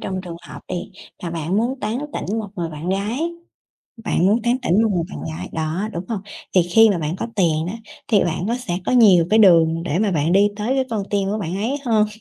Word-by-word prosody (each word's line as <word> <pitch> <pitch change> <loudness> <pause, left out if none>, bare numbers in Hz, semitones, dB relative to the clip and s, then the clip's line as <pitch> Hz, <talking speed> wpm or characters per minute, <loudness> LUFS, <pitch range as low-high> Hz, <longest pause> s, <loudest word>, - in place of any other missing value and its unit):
trong 190 -1 -3
trường 175 -2 -8
hợp - - -9
đi, 180 +1 -5 0.3
mà 175 - -4
bạn 165 +2 -2
muốn 250 +4 -1
tán 215 +3 -2
tỉnh 215 +4 -3
một 215 -2 -4
người 170 -2 -2
bạn 155 +2 -6
gái, 220 - -1 0.7
bạn 180 - +2
muốn 215 +4 +2
tán 240 +1 +2
tỉnh 210 -3 +3
một 225 - +2
người 170 -2 0
bạn - - -7
gái, 80 +3 -6
đó, 160 +6 -2
đúng 170 0 -4
hông? 220 -4 -2 0.3
Thì 185 - +6
khi 220 +6 +5
mà 190 - 0
bạn 155 +2 -3
có - - -2
tiền 165 -4 +2
á, 185 - -4 0.3
thì 205 -3 +4
bạn 175 +1 -2
có 235 - 0
sẽ 185 -8 -3
có - - +1
nhiều 195 -9 +6
cái 220 - +5
đường 165 -5 +5
để 170 -1 -1
mà 210 0 +1
bạn 160 -1 +1
đi 200 +2 +5
tới 220 +5 -1
cái 265 -1 +1
con 220 -3 -1
tim 200 -1 0
của 210 - -1
bạn 180 -3 -3
ấy 230 +8 -1
hơn, 215 -3 +3
195 Hz, 250 wpm, -21 LUFS, 170-220 Hz, 0.7 s, Thì